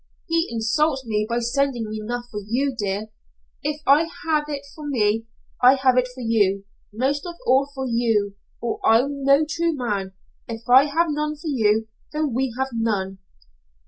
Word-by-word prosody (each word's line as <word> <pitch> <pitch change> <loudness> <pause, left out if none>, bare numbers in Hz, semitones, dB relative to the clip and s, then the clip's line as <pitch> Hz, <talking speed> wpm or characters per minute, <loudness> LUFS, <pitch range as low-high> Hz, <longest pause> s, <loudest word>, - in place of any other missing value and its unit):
"'He 330 +1 +1
insults 265 +5 0
me 215 -1 -1
by 235 - 0
sending 240 0 0 0.2
enough 240 +3 -4
for 210 - -4
you, 260 +7 0
dear. 205 0 -3 0.5
If 300 +1 -3
I 300 +4 +5 0.2
have 305 -2 +1
it 285 -2 -4
for 300 -2 -8
me, 225 -4 +1 0.3
I 255 +2 +7
have 265 -1 +3
it 255 0 +3
for 250 0 -11
you 200 -4 +1 0.3
most 265 +7 -1
of 345 - -6
all 270 +2 +3
for 265 0 -3
you, 225 -4 +1 0.3
or 235 -1 -3
I'm 275 +5 +3
no 275 +3 +5
true 330 +1 0
man. 205 -7 -2 0.3
If 230 0 -7
I 260 +3 +7
have 320 +2 +1
none 300 +1 -1
for 305 +2 -6
you 220 -4 +2 0.3
then 300 -4 -1
we 260 +1 0
have 265 0 -1
none.' 200 -4 -1
255 Hz, 175 wpm, -23 LUFS, 225-285 Hz, 0.5 s, I